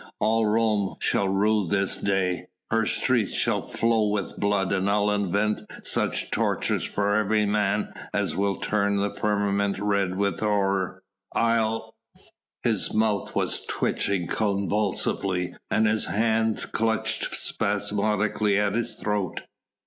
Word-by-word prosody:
All 110 Hz, 0 st, +2 dB
Rome 105 Hz, -2 st, +1 dB
shall 100 Hz, -, +1 dB
rue 105 Hz, 0 st, +2 dB
this 95 Hz, +2 st, +1 dB
day: 90 Hz, -3 st, -1 dB, 0.2 s
her 110 Hz, -1 st, +2 dB
streets 120 Hz, -6 st, +2 dB
shall -, -, +1 dB
flow 115 Hz, -2 st, +1 dB
with 105 Hz, -1 st, -3 dB
blood 100 Hz, -2 st, +1 dB
and 95 Hz, +1 st, +1 dB
I'll 105 Hz, 0 st, +2 dB
invent 105 Hz, +1 st, 0 dB, 0.2 s
such -, -, 0 dB
tortures -, -, 0 dB
for 100 Hz, 0 st, 0 dB
every 110 Hz, 0 st, +2 dB
man 105 Hz, 0 st, 0 dB, 0.2 s
as -, -, -1 dB
will 100 Hz, 0 st, +1 dB
turn 100 Hz, -1 st, 0 dB
the 100 Hz, 0 st, 0 dB
firmament 100 Hz, -1 st, 0 dB
red 100 Hz, -3 st, 0 dB
with 100 Hz, 0 st, 0 dB
horror... 95 Hz, -3 st, 0 dB, 0.3 s
I'll...." 115 Hz, -1 st, +1 dB, 0.7 s
His -, -, +2 dB
mouth 110 Hz, -2 st, 0 dB
was -, -, +1 dB
twitching 95 Hz, -3 st, -1 dB
convulsively 100 Hz, -2 st, -1 dB, 0.2 s
and 110 Hz, +1 st, +2 dB
his 110 Hz, 0 st, +2 dB
hands 110 Hz, +1 st, +1 dB
clutched 110 Hz, 0 st, -1 dB
spasmodically 105 Hz, 0 st, 0 dB
at 100 Hz, -1 st, +1 dB
his 115 Hz, +1 st, -1 dB
throat. 105 Hz, -3 st, -2 dB
105 Hz, 125 wpm, -25 LUFS, 100-110 Hz, 0.7 s, All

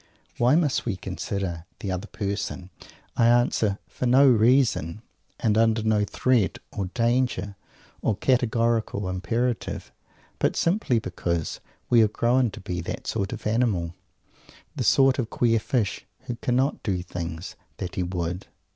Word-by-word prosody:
"Why 125 Hz, +4 st, +5 dB
must 155 Hz, -5 st, +2 dB
we 105 Hz, -, 0 dB
consider 95 Hz, -2 st, -4 dB
the 100 Hz, -, -3 dB
other 95 Hz, +3 st, -3 dB
person?" 100 Hz, -3 st, -4 dB, 0.4 s
I 115 Hz, -, +4 dB
answer 120 Hz, -4 st, +3 dB
for 125 Hz, -, -3 dB
no 135 Hz, +3 st, +6 dB
reason, 115 Hz, -, +3 dB, 0.4 s
and 110 Hz, -3 st, +2 dB
under 115 Hz, -1 st, +3 dB
no 110 Hz, -2 st, +2 dB
threat 120 Hz, -2 st, +1 dB
or 100 Hz, -, -3 dB
danger 115 Hz, -2 st, 0 dB, 0.5 s
or 105 Hz, -, 0 dB
categorical 115 Hz, -5 st, +1 dB
imperative; 115 Hz, +6 st, -2 dB, 0.5 s
but -, -, +1 dB
simply 170 Hz, -, +1 dB
because 85 Hz, -5 st, -2 dB, 0.3 s
we 120 Hz, -, +5 dB
have 110 Hz, -2 st, +4 dB
grown 120 Hz, +1 st, +2 dB
to -, -, -10 dB
be 90 Hz, -1 st, -4 dB
the -, -, -4 dB
sort 100 Hz, -, -2 dB
of -, -, -7 dB
animal, 105 Hz, -7 st, +1 dB, 0.8 s
the -, -, -2 dB
sort 135 Hz, 0 st, +4 dB
of 115 Hz, -3 st, -1 dB
queer 115 Hz, -2 st, +2 dB
fish, 110 Hz, -2 st, -1 dB
who 120 Hz, -, -5 dB
cannot 130 Hz, +4 st, 0 dB
do 95 Hz, -4 st, -1 dB
the 90 Hz, -, -5 dB
things 85 Hz, -1 st, -6 dB, 0.2 s
"that 90 Hz, -, -5 dB
he -, -, -2 dB
would"! 90 Hz, 0 st, -3 dB
110 Hz, 145 wpm, -25 LUFS, 95-120 Hz, 0.8 s, no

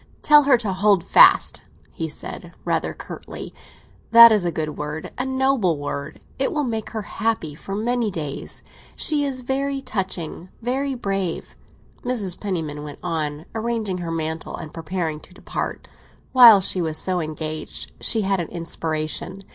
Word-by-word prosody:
"Tell 295 Hz, -1 st, +7 dB
her 275 Hz, -3 st, +6 dB
to 215 Hz, -5 st, -2 dB
hold 195 Hz, -1 st, +3 dB
fast," -, -, +6 dB, 0.3 s
he -, -, -4 dB
said -, -, -7 dB
rather -, -, 0 dB
curtly. -, -, -8 dB, 0.6 s
"That 235 Hz, 0 st, +10 dB
is 210 Hz, -4 st, +3 dB
a 175 Hz, -, +1 dB
good 155 Hz, -2 st, -3 dB
word—a 150 Hz, +11 st, -5 dB
noble 260 Hz, -, +1 dB
word. 145 Hz, 0 st, -5 dB, 0.2 s
It -, -, +1 dB
will 300 Hz, -4 st, 0 dB
make 225 Hz, -4 st, -3 dB
her 220 Hz, -2 st, -4 dB
happy 215 Hz, -8 st, -2 dB
for 195 Hz, +6 st, -7 dB
many 235 Hz, +1 st, 0 dB
days. 155 Hz, -7 st, -6 dB, 0.3 s
She 300 Hz, -2 st, +1 dB
is 265 Hz, -2 st, -3 dB
very 275 Hz, +2 st, -1 dB
touching, 190 Hz, -, -4 dB
very 265 Hz, +3 st, -1 dB
brave," 195 Hz, -7 st, -3 dB, 0.5 s
Mrs. 220 Hz, -8 st, -2 dB
Penniman 160 Hz, -7 st, -3 dB
went 145 Hz, -1 st, -8 dB
on, 155 Hz, -3 st, -3 dB
arranging 220 Hz, -4 st, -2 dB
her 170 Hz, -1 st, -4 dB
mantle 160 Hz, 0 st, -3 dB
and 155 Hz, -2 st, -9 dB
preparing 165 Hz, -1 st, -3 dB
to 180 Hz, -, -17 dB
depart. -, -, -5 dB, 0.4 s
While 235 Hz, -6 st, +9 dB
she 185 Hz, 0 st, 0 dB
was 160 Hz, -2 st, -1 dB
so 185 Hz, +1 st, +1 dB
engaged 155 Hz, 0 st, -5 dB
she 225 Hz, -, +3 dB
had 195 Hz, -1 st, +1 dB
an 170 Hz, -, -2 dB
inspiration. 165 Hz, +2 st, -3 dB
190 Hz, 155 wpm, -22 LUFS, 160-235 Hz, 0.6 s, That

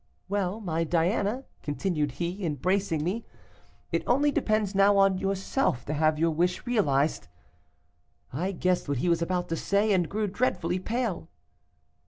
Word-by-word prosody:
"'Well, 200 Hz, +1 st, -1 dB
my 165 Hz, -6 st, -1 dB
Diana,' 195 Hz, -, 0 dB, 0.2 s
continued 150 Hz, -2 st, -1 dB
he, 175 Hz, +6 st, -4 dB
embracing 165 Hz, +1 st, 0 dB
me, 195 Hz, +8 st, -2 dB, 0.7 s
'it -, -, +1 dB
only 285 Hz, +4 st, +3 dB
depends 215 Hz, -6 st, 0 dB
now 200 Hz, +1 st, +5 dB
on 195 Hz, -1 st, +4 dB
yourself 195 Hz, -, -1 dB
to 150 Hz, -, -3 dB
have 155 Hz, 0 st, +2 dB
your 165 Hz, +1 st, +2 dB
wish 175 Hz, +6 st, 0 dB
realized.' 160 Hz, -, +1 dB, 1.1 s
I 180 Hz, +8 st, -1 dB
guessed 180 Hz, -3 st, 0 dB
what 140 Hz, -, 0 dB
he 175 Hz, -, 0 dB
was 170 Hz, 0 st, +2 dB
about 180 Hz, +1 st, -1 dB
to 165 Hz, -, 0 dB
say, 200 Hz, +5 st, +1 dB
and 180 Hz, -4 st, +1 dB
grew 215 Hz, +1 st, -1 dB
dreadfully 185 Hz, -4 st, 0 dB
pale. 220 Hz, -5 st, -2 dB
185 Hz, 150 wpm, -27 LUFS, 165-205 Hz, 1.1 s, now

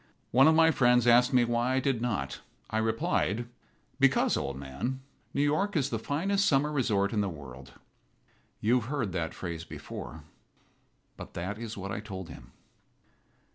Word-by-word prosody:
One 135 Hz, +4 st, +6 dB
of 160 Hz, -, +5 dB
my 160 Hz, 0 st, +6 dB
friends 125 Hz, -4 st, +4 dB
asked 120 Hz, +2 st, +5 dB
me 125 Hz, -2 st, +4 dB
why 120 Hz, +2 st, 0 dB
I -, -, +3 dB
did 130 Hz, -3 st, 0 dB
not. 105 Hz, -, -2 dB, 0.3 s
I 110 Hz, -, +1 dB
replied: 110 Hz, 0 st, 0 dB, 0.5 s
"Because, -, -, +3 dB
old -, -, -3 dB
man, 70 Hz, -, -4 dB, 0.3 s
New 140 Hz, -, +1 dB
York 155 Hz, +8 st, +1 dB
is 140 Hz, -3 st, +1 dB
the 115 Hz, -, -1 dB
finest 195 Hz, -, 0 dB
summer 145 Hz, -1 st, +2 dB
resort 105 Hz, -8 st, +1 dB
in 105 Hz, -, +1 dB
the 100 Hz, -, -1 dB
world." 65 Hz, -5 st, -10 dB, 0.9 s
You 120 Hz, +4 st, +3 dB
have 115 Hz, +1 st, -8 dB
heard 130 Hz, -9 st, -1 dB
that 85 Hz, -2 st, -3 dB
phrase 85 Hz, -3 st, -5 dB
before. -, -, -8 dB, 0.9 s
But -, -, -10 dB
that 100 Hz, +5 st, -4 dB
is 115 Hz, -2 st, -6 dB
what 100 Hz, 0 st, -5 dB
I -, -, -3 dB
told 95 Hz, -4 st, -7 dB
him. -, -, -12 dB
120 Hz, 170 wpm, -29 LUFS, 95-135 Hz, 0.9 s, One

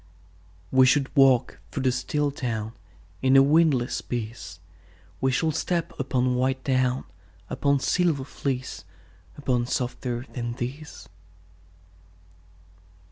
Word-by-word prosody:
We 130 Hz, 0 st, +6 dB
shall 140 Hz, +2 st, +4 dB
walk 135 Hz, -6 st, +4 dB
through 110 Hz, -, -4 dB
the 130 Hz, -, +3 dB
still 145 Hz, +3 st, -1 dB
town 115 Hz, -5 st, -4 dB, 0.5 s
In 130 Hz, +1 st, +5 dB
a 135 Hz, -, +8 dB
windless 145 Hz, -4 st, +3 dB
peace; 110 Hz, -8 st, -6 dB, 0.6 s
We 130 Hz, +1 st, +2 dB
shall 145 Hz, +5 st, +1 dB
step 170 Hz, +2 st, -2 dB
upon 130 Hz, -2 st, +1 dB
white 130 Hz, +1 st, 0 dB
down, 130 Hz, -1 st, +1 dB, 0.5 s
Upon 140 Hz, -1 st, +1 dB
silver 160 Hz, -2 st, +1 dB
fleece, 130 Hz, -, -4 dB, 0.5 s
Upon 125 Hz, -4 st, 0 dB
softer 125 Hz, -1 st, -3 dB
than 120 Hz, -2 st, -3 dB
these. 135 Hz, +6 st, -7 dB
130 Hz, 110 wpm, -25 LUFS, 125-140 Hz, 0.6 s, a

